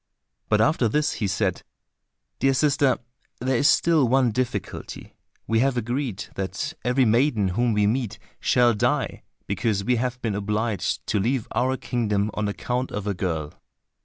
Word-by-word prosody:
But 105 0 +3
after 130 -2 +3
this 150 +5 +1
he 100 - +2
said, 95 -1 0 0.8
"Dear 135 0 +3
sister, 140 -1 +3 0.4
there 130 +1 +1
is 145 - +4
still 160 -6 +4
one 130 -1 +3
difficulty. 125 +2 -4 0.3
We 115 0 +1
have 130 0 +2
agreed 120 -2 -2
that 95 - -3
every 125 +1 +3
maiden 115 -3 +2
whom 120 +5 +1
we 105 0 +2
meet 115 0 -1 0.2
shall 120 -1 +3
die, 105 - 0 0.2
because 100 0 -1
we 125 +3 +2
have 125 +1 -2
been 115 -4 -2
obliged 105 0 -1
to 105 - 0
leave 120 +3 0
our 130 +2 +1
kingdom 105 -5 -1
on 105 -1 -1
account 125 +5 -2
of 105 -1 -4
a 105 - 0
girl." 80 -5 -3
120 Hz, 160 wpm, -24 LUFS, 105-130 Hz, 0.8 s, is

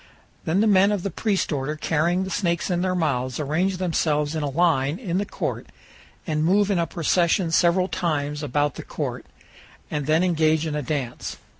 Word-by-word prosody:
Then 175 +5 +2
the - - +3
men 200 -1 +5
of 200 -4 -1
the 200 - -2
priest 200 0 -1
order 145 +1 -2
carrying 170 +4 0
the 190 - -5
snakes 170 -1 -1
in 175 0 0
their 185 0 0
mouths 130 -7 -1
arrange 170 +6 0
themselves 155 -4 0
in 160 - -2
a 145 - -1
line 145 -1 +1
in 185 -6 -2
the 205 - -2
court - - -4 0.6
and 155 -2 -1
move 200 +4 +3
in 190 - +1
a 170 - 0
procession 170 +1 +1
several 175 +2 +3
times 150 -6 -2
about 145 0 0
the - - -6
court, - - -5 0.6
and 150 -2 -2
then 160 +3 +3
engage 160 -3 +2
in 155 - -3
a 150 - -1
dance. 130 -3 -4
165 Hz, 190 wpm, -24 LUFS, 150-185 Hz, 0.6 s, men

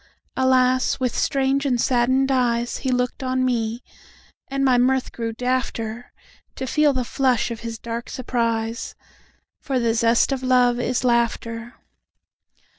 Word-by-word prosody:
Alas! 255 0 +2
with 255 -2 -1
strange 275 0 +1
and 255 -4 0
saddened 260 +2 +2
eyesHe 245 0 0
looked 250 +1 -1
on 255 0 0
me; 235 -1 -1 0.6
and 275 0 -1
my 255 -2 +4
mirth 255 +1 +2
grew 230 -1 -4
dafter, 245 -1 -2 0.5
To 265 - -4
feel 300 +3 +3
the 260 -2 -1
flush 250 -2 0
of 230 - -5
his 230 -1 -6
dark 235 +1 -6
surprise; 230 -2 -2 0.6
For 270 -3 -2
the 230 -1 +1
zest 230 +3 +3
of 270 -1 -1
love 250 -1 +3
is 245 +1 -1
laughter. 235 -1 -1
250 Hz, 135 wpm, -22 LUFS, 235-260 Hz, 0.6 s, my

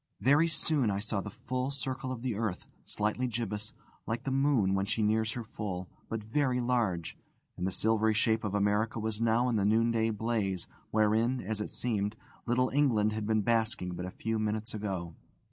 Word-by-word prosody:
Very 145 +6 +5
soon 155 -6 +1
I 100 - 0
saw 100 0 -2
the 105 - -6
full 130 +5 -3
circle 135 -1 -4
of 125 -2 -5
the 125 -3 0
earth, 105 -3 -2 0.2
slightly 105 +4 -1
gibbous, 110 -2 -3 0.4
like 115 +2 -2
the 135 - -2
moon 135 -8 +3
when 95 0 +1
she 110 +1 0
nears 110 +1 +2
her 120 - -4
full, 95 -5 -5 0.2
but 110 -1 -3
very 125 +3 +1
large; 115 -9 0 0.4
and 90 - -2
the - - -1
silvery 110 +1 +2
shape 110 +1 +2
of 105 -1 -1
America 105 +3 +1
was 110 0 -2
now 115 +2 +3
in 120 -3 +1
the 100 - +2
noonday 115 +2 +3
blaze 105 -4 -1 0.2
wherein 110 +4 +2
(as 105 +1 -3
it - - -3
seemed) 105 -3 -1 0.3
little 125 +2 +2
England 115 -7 +3
had 110 -1 -3
been 110 -1 +2
basking 110 -4 0
but 90 +1 -4
a - - -3
few 110 +4 -2
minutes 110 +1 -2
ago. 95 -6 -3
110 Hz, 190 wpm, -31 LUFS, 105-120 Hz, 0.4 s, Very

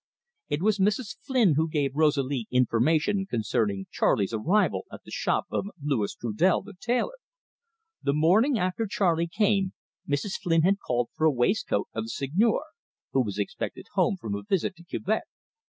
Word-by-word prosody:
It 145 +3 -1
was 215 -1 +2
Mrs. 210 +3 +1
Flynn 240 - +3
who 160 +3 +1
gave 145 -4 0
Rosalie 140 -6 +1
information 150 - +2
concerning 105 - -1
Charley's 100 +2 +1
arrival 175 - +1
at - - -10
the - - -13
shop - - 0
of - - -1
Louis 140 -8 -1
Trudel 120 - +1
the 210 +1 -11
tailor. 245 - -1 0.8
The 140 - +1
morning 210 - +4
after 185 +4 -1
Charley 170 -4 +1
came, 200 0 +1 0.4
Mrs. 145 +8 -1
Flynn 165 -2 +2
had 195 +3 +3
called 120 -6 -1
for 155 - 0
a 160 - +6
waistcoat 125 - 0
of 110 0 -3
the - - -8
Seigneur, 185 - +1 0.5
who 135 - +3
was 100 -3 -5
expected 100 - -4
home 195 - +2
from 110 - -5
a 100 - -3
visit 185 - -1
to 170 - -14
Quebec. 205 +5 -2
160 Hz, 165 wpm, -27 LUFS, 125-200 Hz, 0.8 s, a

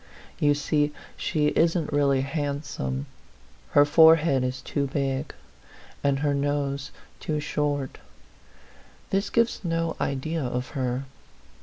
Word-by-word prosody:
You 145 -1 +4
see 150 0 +1 0.2
she 150 -1 +1
isn't 165 -1 +1
really 140 -2 +3
handsome; 140 - -3 0.7
her 145 - +7
forehead 160 -3 +6
is 130 0 -3
too 140 -2 -1
big, 135 0 -2 0.7
and 140 -1 +1
her 145 -1 +2
nose 140 0 -1 0.3
too 150 -1 -2
short. 145 -2 -2 1.1
This 195 +1 +1
gives 230 -2 +1
no 165 -1 -1
idea 155 +4 -1
of 125 0 -3
her. 130 -2 -2
145 Hz, 115 wpm, -26 LUFS, 135-155 Hz, 1.1 s, her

